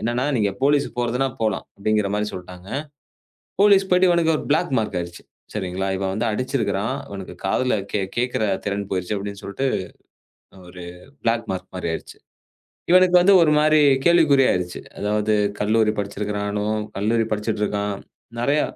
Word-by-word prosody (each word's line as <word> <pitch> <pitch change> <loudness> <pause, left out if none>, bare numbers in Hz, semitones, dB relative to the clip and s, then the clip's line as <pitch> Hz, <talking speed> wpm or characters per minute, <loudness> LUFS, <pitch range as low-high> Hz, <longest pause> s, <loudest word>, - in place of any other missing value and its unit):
என்னன்னா, 120 +4 -1
"நீங்க 105 -3 +1
போலீஸ்க்கு 140 -2 +2
போறதுன்னா 125 +3 0
போலாம்" 110 -3 0
அப்படிங்கிற 105 0 0
மாரி 105 0 0
சொல்ட்டாங்க. 90 +1 -10 0.9
போலீஸ்க்கு 195 -2 +5
போயிட்டு 180 0 +5
இவனுக்கு 170 -2 +3
ஒரு - - -6
பிளாக் 155 -1 +1
மார்க் 105 -4 -2
ஆயிடுச்சு. 85 0 -7 0.3
சரிங்களா? 95 -1 -3
இவன் 95 0 -2
வந்து 110 +4 -1
அடிச்சிருக்கிறான். 110 -4 -1
இவனுக்குக் 95 -2 -9
காதுல 125 +5 +1 0.2
கேக் 95 -2 -2
கேக்குற 125 -2 0 0.2
திறன் 100 0 -3
போயிருச்சு 95 +2 -2
அப்படின்னு 100 0 -6
சொல்லிட்டு 135 +7 -2 1.0
ஒரு 90 0 -10 0.4
பிளாக் 115 0 +1
மார்க் 95 0 -7
மாரி 90 - -3
ஆயிருச்சு. - - -7 0.8
இவனுக்கு 185 0 +6
வந்து 195 +3 +6
ஒரு 155 - +4
மாரி 155 0 +4 0.2
கேள்விக்குறியா 155 -6 +5
ஆயிருச்சு. 90 -1 -3 0.2
அதாவது 105 +1 0 0.3
கல்லூரி 105 +1 +2
படிச்சிருக்கிறானும், 105 +1 -2 0.2
கல்லூரி 110 +3 +1
படிச்சிட்டு 105 0 -2
இருக்கான். 100 -1 -2 0.4
நிறைய, 140 +5 +2
105 Hz, 145 wpm, -22 LUFS, 100-135 Hz, 1.0 s, இவனுக்கு